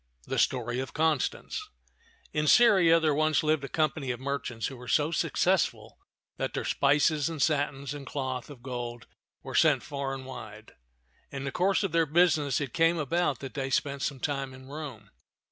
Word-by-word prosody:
THE - - -2
STORY 120 -1 0
OF 130 - -5
CONSTANCE 160 - -1 0.6
IN 150 0 0
Syria 190 -8 +6
there 155 -2 +2
once 155 +2 +2
lived 155 -2 +1
a - - -3
company 155 -3 0
of 120 -2 -2
merchants 130 -5 -3
who 135 - -4
were 125 0 -11
so 150 +5 +2
successful 155 - 0 0.4
that - - -3
their - - -2
spices 145 +1 +2
and 160 -2 -6
satins 140 -2 0
and 145 -1 -8
cloth 130 -2 -4
of 130 -5 -12
gold 120 -2 -5 0.4
were - - -7
sent - - +4
far 140 -1 -4
and 130 -1 -8
wide. 110 -4 -10 0.6
In 135 -1 -6
the 135 - -3
course 190 +6 +1
of 195 - -1
their 165 -1 +2
business 155 -3 +3
it 140 -4 -4
came 165 0 +3
about 150 -2 0
that 135 -2 -7
they 135 -2 -3
spent 140 +1 -1
some 140 -2 -2
time 135 0 -3
in 130 +1 -13
Rome. 140 -9 -8
140 Hz, 180 wpm, -28 LUFS, 130-155 Hz, 0.6 s, Syria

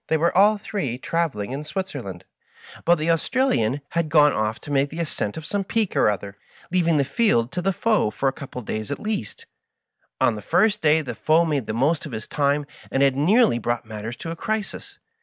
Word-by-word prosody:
They 160 - +2
were 170 +2 +1
all 205 +3 +5
three 195 - -3
travel 165 -5 -1
ing 100 - -5
in 140 +3 -4
Switzerland, 145 - -5 0.6
but 175 - +5
the 165 +1 0
Australian 165 - +1
had 170 -2 -1
gone 150 -1 +5
off 110 +1 -1
to 145 - -8
make 140 0 +2
the 160 - -7
ascent 150 -9 -2
of 160 - -7
some 200 +4 -2
peak 215 +1 -1
or - - +4
other, 100 0 -4 0.3
leaving 170 -3 +2
the 140 - +2
field 130 - +1
to 180 - -3
the 195 +2 +1
foe 215 - +1
for 135 - -2
a - - +3
couple 140 -3 -10
of 125 - -5
days 110 +3 -4
at 145 - -2
least. 210 - -4 0.7
On 120 - +3
the 105 - -6
first 210 - +2
day 155 0 +3
the 135 - -5
foe 160 +2 +3
made 145 -7 -1
the - - -2
most 145 +7 +1
of 140 - -10
his 110 -1 -5
time, 145 0 +1 0.2
and 135 - +1
had 135 -1 +3
nearly 175 - +4
brought 120 +1 -2
matters 110 +2 -6
to 165 - -6
a - - -4
crisis. 215 +4 -4
150 Hz, 220 wpm, -23 LUFS, 120-175 Hz, 0.7 s, all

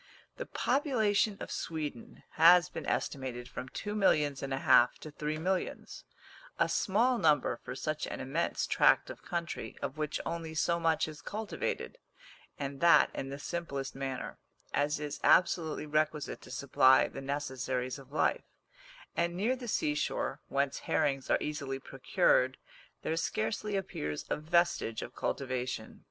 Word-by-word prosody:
The - - -5
population 220 -7 +1
of - - -6
Sweden 150 -7 -5
has 170 +2 +7
been - - -6
estimated 125 -3 -2
from 125 0 -7
two 205 +9 -5
millions 150 -9 +2
and 135 - -4
a 135 - 0
half 125 -2 +5
to 155 - -8
three 150 +1 -3
millions; 185 +3 -3 0.5
a - - +3
small 235 +5 +2
number 150 -3 +3
for 125 - -8
such 155 +3 -2
an - - -5
immense 140 +6 -1
tract - - +4
of - - -11
country, 170 -1 -4
of 140 +2 -5
which 150 -1 -1
only 165 -1 -4
so 170 +1 +1
much 165 -1 +2
is 155 -2 -9
cultivated 220 - -4 0.6
and 140 -1 -5
that 170 0 +6
in 135 - -4
the 140 - -5
simplest 140 -4 -4
manner 135 -1 -5 0.3
as 145 +1 +1
is 150 -1 -5
absolutely 160 -4 +3
requisite 155 0 -1
to - - -13
supply 130 0 +4
the 135 - -8
necessaries 130 -2 -3
of 135 0 -15
life; 155 - 0 0.7
and 170 0 0
near 220 +8 +1
the 250 -1 -8
seashore, 150 -8 -1
whence 140 0 0
herrings 135 -2 0
are - - +4
easily 145 -3 -3
procured, 130 -1 +2 0.5
there 160 - 0
scarcely 210 +4 -1
appears 75 - -3
a - - +3
vestige 170 -7 +1
of - - -8
cultivation. 125 -4 -3
150 Hz, 150 wpm, -31 LUFS, 135-170 Hz, 0.7 s, has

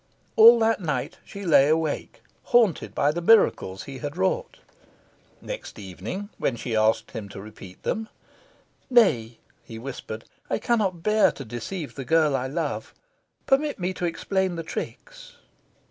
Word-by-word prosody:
All 230 +2 +9
that 225 -1 +2
night, 150 -7 -3
she 200 0 -9
lay 150 -5 +6
wide 155 - +5
awake, 160 -2 -3 0.2
haunted 230 -8 +2
by 145 - +3
the 170 +3 -3
miracles 170 - +3
he 135 -1 -8
had 145 +2 -5
wrought. 190 - -1 0.9
Next - - -7
evening, 105 - -6
when 125 - 0
she 115 0 -4
asked 110 0 +2
him 110 -4 -6
to 100 - -9
repeat 95 -3 -12
them, 220 0 -2 0.8
"Nay," 130 - +3 0.3
he 115 - -9
whispered, 115 -3 -7 0.3
"I - - +1
cannot 200 -9 0
bear 215 0 +4
to 135 - -8
deceive 140 - -6
the 135 - -6
girl 155 +1 +3
I 130 0 -1
love. 150 +2 -4 0.5
Permit 285 +2 +2
me 185 0 -2
to 180 - -3
explain 190 +2 -1
the 165 - -4
tricks." - - -7
165 Hz, 155 wpm, -25 LUFS, -, 0.9 s, All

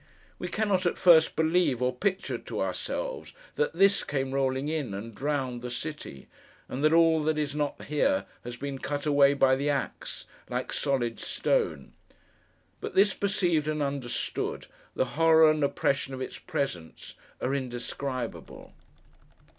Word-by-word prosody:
We 180 - -3
cannot, 190 -1 +1
at - - -1
first, 165 -3 +6
believe, 160 -5 +2
or 125 0 +1
picture 190 +7 -1
to - - -6
ourselves, - - -3 0.2
that 470 +1 0
THIS 195 0 +4
came 135 -2 -2
rolling 135 0 0
in, 150 -10 -2
and 110 +3 -7
drowned 130 0 -2
the 125 - -5
city; 125 - -6 0.4
and 135 +3 -4
that 155 - +5
all 165 -1 +5
that 155 0 0
is 150 -2 -1
not 145 -1 -2
here, 280 - +1 0.2
has 120 0 -7
been 140 0 -5
cut 145 +1 -3
away, 140 -1 +5
by 135 -1 +4
the 140 +2 -1
axe, 140 -1 -3 0.2
like - - -3
solid 130 -5 -1
stone. - - -1 0.9
But - - -6
this 200 0 +5
perceived 180 -7 +1
and 155 -1 0
understood, 140 -3 -3 0.3
the - - +2
horror 160 +1 +5
and 155 -1 0
oppression 140 -1 0
of 130 - -7
its 130 - -6
presence 135 - -4 0.3
are 130 - -1
indescribable. 130 -1 -5
145 Hz, 150 wpm, -28 LUFS, 130-165 Hz, 0.9 s, first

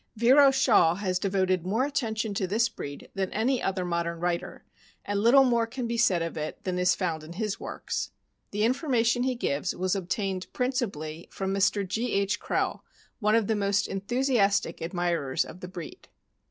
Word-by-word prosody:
Vero 265 +5 +6
Shaw 240 -11 +4
has 185 -2 -1
devoted 185 -2 +1
more 220 +8 +1
attention 225 -7 -2
to 190 -1 -1
this 225 +5 +2
breed 145 0 -8
than 190 -1 -2
any 245 +4 +1
other 190 -1 -1
modern 170 -1 -2
writer, 175 0 -3 0.4
and 205 0 -1
little 240 +6 +6
more 235 -3 +2
can 255 +1 -4
be 235 0 -2
said 195 -8 +3
of 165 - -4
it 155 0 -5
than 180 -1 -2
is 180 0 +3
found 165 -5 -2
in 160 +2 -9
his 210 +2 -3
works. - - -4 0.4
The 210 +1 -1
information 245 -1 +2
he 255 0 0
gives 150 -7 -1
was 185 0 0
obtained, 190 0 -2
principally, 190 - -2
from 195 0 -3
Mr. 200 0 +1
G. 225 +6 -2
H. 200 0 +1
Krehl, - - -1 0.4
one 215 -1 +3
of 230 -2 +3
the 220 - +1
most 200 0 +1
enthusiastic 205 0 +1
admirers 170 -5 -1
of 180 - -11
the 180 - -7
breed. 175 -4 -9
200 Hz, 180 wpm, -27 LUFS, 180-235 Hz, 0.4 s, Vero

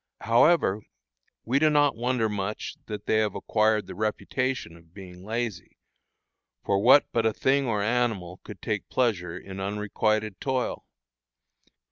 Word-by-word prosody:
However, 115 - +3 0.6
we 130 +4 +2
do 155 +1 +4
not 145 -3 +3
wonder 120 0 0
much 105 0 -4
that 105 -2 -6
they 110 - +2
have 105 -2 0
acquired 110 -1 +1
the - - -8
"reputation" 110 -1 -2
of 85 0 -20
being 90 -2 -11
lazy, 110 -4 -4 0.9
for 100 -1 +2
what 130 +5 +7
but 115 - +1
a 110 - +3
thing 135 +3 +1
or 105 -3 0
an - - 0
animal 100 -7 -1
could 100 -5 -11
take 105 -2 -3
pleasure 95 -9 0
in 95 0 -9
unrequited 105 +1 -1
toil? 130 -2 -2
110 Hz, 145 wpm, -26 LUFS, 100-120 Hz, 0.9 s, what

